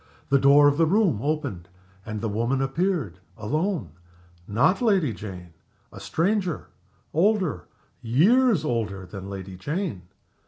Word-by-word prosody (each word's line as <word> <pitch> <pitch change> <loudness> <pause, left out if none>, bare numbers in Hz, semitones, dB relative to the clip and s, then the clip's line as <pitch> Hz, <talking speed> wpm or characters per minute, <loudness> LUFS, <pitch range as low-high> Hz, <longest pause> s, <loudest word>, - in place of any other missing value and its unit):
The 140 0 +4
door 140 +2 +6
of 145 0 +2
the 165 -1 +3
room 185 - +2
opened, 140 - -3 0.4
and 105 -1 -4
the 115 - -1
woman 115 +5 0
appeared 135 - -1 0.2
alone. 150 - -2 0.6
Not 120 - +2
Lady 190 - +2
Jane. 90 -3 -9 0.4
A - - -11
stranger 185 -1 -1 0.4
older, 175 - +1 0.4
years 185 - +3
older, 105 -7 -2
than 95 +1 -8
Lady 95 -1 -7
Jane. 150 - -3
140 Hz, 125 wpm, -25 LUFS, -, 0.6 s, door